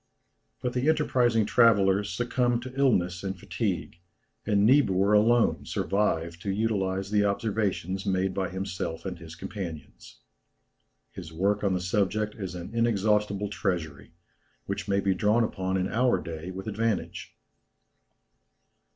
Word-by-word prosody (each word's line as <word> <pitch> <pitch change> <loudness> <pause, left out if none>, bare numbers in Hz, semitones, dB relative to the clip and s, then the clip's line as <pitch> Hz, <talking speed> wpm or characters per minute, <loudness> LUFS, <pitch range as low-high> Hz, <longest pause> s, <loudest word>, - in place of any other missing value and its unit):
But 125 -1 -1
the 130 +4 +1
enterprising 125 -8 +2
travellers 100 -3 +4
succumbed 120 +4 0
to 130 0 -8
illness 90 -10 +2
and 95 -1 -3
fatigue, 85 - -3 0.5
and 100 -2 +3
Niebuhr 105 -6 +4
alone 115 +3 +3
survived 85 -4 -1
to 100 - -4
utilize 95 -2 -1
the 105 -1 +3
observations 100 -2 -1
made 95 0 0
by 95 -1 -2
himself 95 -3 -4
and 95 - -5
his 85 0 -10
companions. 85 -5 -8 0.9
His 85 -4 -9
work 100 +6 0
on 95 -2 +2
the - - 0
subject 105 +4 0
is 95 -4 -6
an 90 +5 -7
inexhaustible 105 -3 +1
treasury, 85 -9 -3 0.5
which - - -4
may 100 0 +1
be 95 -1 +2
drawn 110 +4 +2
upon 95 -3 -2
in 95 0 0
our 120 +4 +2
own - - -7
day 85 +1 -6
with 95 +1 -7
advantage. 110 -1 -2
100 Hz, 135 wpm, -27 LUFS, 95-110 Hz, 0.9 s, travellers